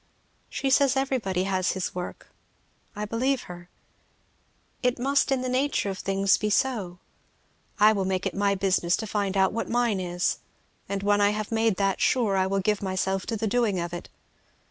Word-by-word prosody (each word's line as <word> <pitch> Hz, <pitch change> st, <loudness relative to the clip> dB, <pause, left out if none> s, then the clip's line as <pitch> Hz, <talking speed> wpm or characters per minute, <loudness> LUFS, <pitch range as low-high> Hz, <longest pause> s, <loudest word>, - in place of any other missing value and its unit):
She 270 Hz, -, -2 dB
says 275 Hz, 0 st, +4 dB
everybody 235 Hz, -9 st, 0 dB
has 190 Hz, -1 st, 0 dB
his 190 Hz, -1 st, -3 dB
work, 180 Hz, 0 st, -7 dB, 0.6 s
I 210 Hz, +1 st, -3 dB
believe 250 Hz, +5 st, 0 dB
her. 175 Hz, 0 st, -11 dB, 1.1 s
It 250 Hz, -1 st, +1 dB
must 275 Hz, +3 st, +1 dB
in 265 Hz, -1 st, +1 dB
the 255 Hz, -, -2 dB
nature 255 Hz, -5 st, 0 dB
of 190 Hz, -, -7 dB
things 195 Hz, 0 st, +2 dB
be 210 Hz, -, 0 dB
so. 210 Hz, -6 st, 0 dB, 0.8 s
I 215 Hz, +1 st, +7 dB
will 195 Hz, -2 st, -1 dB
make 185 Hz, -1 st, -1 dB
it -, -, -1 dB
my 200 Hz, 0 st, +1 dB
business 185 Hz, -2 st, +1 dB
to 220 Hz, -, -4 dB
find 205 Hz, -2 st, -1 dB
out 190 Hz, 0 st, +3 dB
what 230 Hz, -, -3 dB
mine 235 Hz, -4 st, +1 dB
is, 175 Hz, -1 st, -1 dB, 0.5 s
and 200 Hz, 0 st, -2 dB
when 205 Hz, 0 st, +3 dB
I 205 Hz, -, +5 dB
have 215 Hz, +1 st, -3 dB
made 225 Hz, -2 st, +2 dB
that 195 Hz, 0 st, 0 dB
sure 225 Hz, -6 st, +2 dB
I 190 Hz, 0 st, +2 dB
will 195 Hz, 0 st, 0 dB
give 210 Hz, +1 st, 0 dB
myself 190 Hz, 0 st, -1 dB
to 225 Hz, -, -2 dB
the 220 Hz, -, -2 dB
doing 215 Hz, -3 st, +1 dB
of 170 Hz, 0 st, -4 dB
it. 175 Hz, -, -7 dB
200 Hz, 190 wpm, -26 LUFS, 190-235 Hz, 1.1 s, I